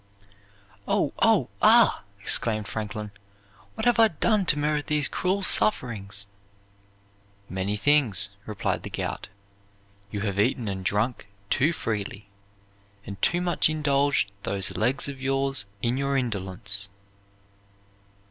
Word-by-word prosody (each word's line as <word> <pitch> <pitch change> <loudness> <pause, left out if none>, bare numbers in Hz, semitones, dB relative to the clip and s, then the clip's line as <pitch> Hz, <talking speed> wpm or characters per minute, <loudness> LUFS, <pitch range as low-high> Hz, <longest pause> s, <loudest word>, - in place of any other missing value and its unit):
"Oh! - - +1
oh! - - +3
ah!" - - +5 0.2
exclaimed 110 -3 +2
Franklin; 105 -1 -5 0.6
"what 220 - -4
have 240 -1 +3
I 225 - +7
done 210 +3 +1
to 150 - +3
merit 150 0 -1
these 150 -2 +2
cruel 195 +2 -1
sufferings?" 100 - +1 1.2
"Many 95 +3 -2
things," 115 - +3 0.2
replied 105 -2 -2
the - - -7
Gout; - - -4 0.8
"you 105 -1 -4
have 100 -2 -2
eaten 115 +1 +1
and 95 -2 -4
drunk 105 +4 -1 0.2
too 145 +5 +3
freely, 105 -7 -4 0.8
and 100 -1 -8
too 175 0 +2
much 175 -3 +2
indulged 145 -7 +1
those 100 -1 -1
legs 135 +3 +2
of 135 -2 -7
yours 135 -4 0 0.2
in 120 +2 +1
your 140 0 0
indolence." 100 -4 -2
120 Hz, 120 wpm, -25 LUFS, 100-145 Hz, 1.2 s, I